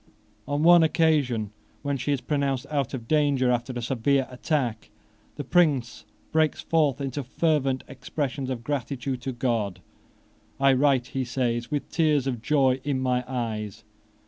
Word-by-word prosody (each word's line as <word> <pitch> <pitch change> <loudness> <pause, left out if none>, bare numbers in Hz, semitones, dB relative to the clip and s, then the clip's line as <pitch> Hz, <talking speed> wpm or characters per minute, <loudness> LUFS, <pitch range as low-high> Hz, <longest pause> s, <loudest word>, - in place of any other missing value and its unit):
On 145 +1 0
one 175 0 +8
occasion, 150 - +2 0.3
when 140 -1 -1
she 135 +2 -2
is 140 -3 0
pronounced 140 -1 -1
out 140 -3 -1
of 115 -3 -8
danger 140 -4 +2
after 120 +1 -1
a 120 -1 -4
severe 135 +2 +1
attack, 125 -4 -2 0.5
the 145 - -5
Prince 145 -6 +1 0.3
breaks 155 -1 +2
forth 150 -6 +1
into 140 0 -3
fervent 135 -1 0
expressions 135 0 -4
of 120 -3 -4
gratitude 130 -1 -3
to 130 - -3
God. 115 -7 -1 0.8
"I 135 0 +5
write," 130 -2 +2
he 135 -2 -2
says, 120 -1 -1
"with 145 -1 -3
tears 150 -5 +2
of 125 -4 -2
joy 135 -1 +2
in 140 -2 -1
my 125 -1 0
eyes." 110 -5 -4
135 Hz, 150 wpm, -26 LUFS, 125-145 Hz, 0.8 s, one